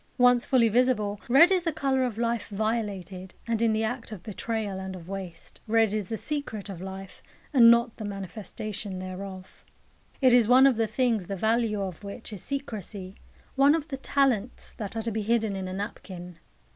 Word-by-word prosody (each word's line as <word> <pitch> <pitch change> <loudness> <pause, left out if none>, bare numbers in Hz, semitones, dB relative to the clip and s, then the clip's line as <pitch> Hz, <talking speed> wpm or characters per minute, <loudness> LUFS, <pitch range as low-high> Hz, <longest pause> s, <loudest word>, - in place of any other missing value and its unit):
Once 245 -1 +5
fully 245 -3 +4
visible, 220 -3 +1
red 285 +9 +7
is 370 -2 +3
the 335 -1 -1
colour 270 -4 +1
of 240 -4 -2
life 235 0 -1
violated, 200 -4 -3
and 230 -1 -1
in 230 -1 +3
the 220 0 +1
act 230 +1 -3
of 195 -5 -8
betrayal 215 -2 -3
and 190 0 -5
of 175 -2 -10
waste. 185 -3 -7
Red 225 -1 +3
is 210 -3 -2
the 225 - -2
secret 255 -9 -4
of 185 -3 -7
life, 190 0 -8 0.3
and 235 -4 +8
not 235 0 +4
the 220 - -6
manifestation 200 0 -5
thereof. 185 0 -8 0.6
It 255 -3 +5
is 240 -3 +6
one 255 +3 +7
of 270 -2 +5
the 225 0 +1
things 225 -4 0
the 195 - -3
value 220 0 +1
of 185 0 -6
which 210 +2 -8
is 195 - -6
secrecy, 210 -8 -6 0.4
one 280 +3 +5
of 320 -1 -4
the 270 - -3
talents 260 -4 0
that 210 -2 -5
are 225 - -2
to 230 - -2
be 220 +1 -2
hidden 220 -1 +1
in 190 -1 -4
a 185 - -5
napkin. 185 -3 -7
220 Hz, 195 wpm, -27 LUFS, 195-245 Hz, 0.6 s, and